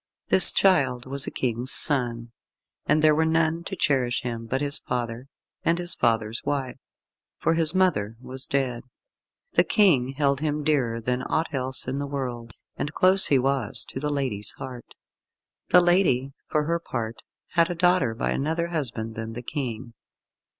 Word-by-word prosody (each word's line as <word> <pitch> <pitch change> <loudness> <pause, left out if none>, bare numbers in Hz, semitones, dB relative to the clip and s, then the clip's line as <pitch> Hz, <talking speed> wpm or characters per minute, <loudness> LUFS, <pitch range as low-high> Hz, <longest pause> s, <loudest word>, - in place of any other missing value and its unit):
This 190 - +11
Childe 140 -10 +2
was 135 +1 +1
a - - -1
King's 125 +1 -3
son, 120 -5 0 0.6
and 155 +1 +2
there 155 -1 +5
were 160 +2 +1
none 160 +1 0
to 195 - -5
cherish 130 -7 0
him 115 -2 -6
but 130 +3 -2
his 145 0 +6
father 120 +1 -5 0.3
and 165 +1 0
his 175 -1 +2
father's 115 -3 -1
wife, 140 -3 -3 0.6
for 165 - 0
his 165 +1 0
mother 115 - 0
was 130 +1 -6
dead. 130 -4 -2 0.7
The - - +4
King 140 - +2
held 140 -1 0
him 150 0 -3
dearer 130 -7 0
than 125 +2 -2
aught 160 +4 -3
else 130 -1 -4
in 135 +2 -3
the 140 - -4
world, 125 -4 -6 0.2
and 145 - -4
close 185 +4 +4
he 140 - +3
was 130 -4 -2
to - - -6
the 150 +2 -3
lady's 130 -8 -1
heart. 125 -2 -10 0.7
The 180 - +6
lady, 175 -7 +1 0.2
for 150 - 0
her 170 +3 -1
part, 115 -7 -6 0.3
had 170 -1 +1
a 175 - -4
daughter 175 -9 +1
by - - -2
another 165 +4 -2
husband 120 -9 -3
than 115 0 -7
the 120 +2 -8
King. 120 -4 -6
135 Hz, 170 wpm, -24 LUFS, 120-160 Hz, 0.7 s, This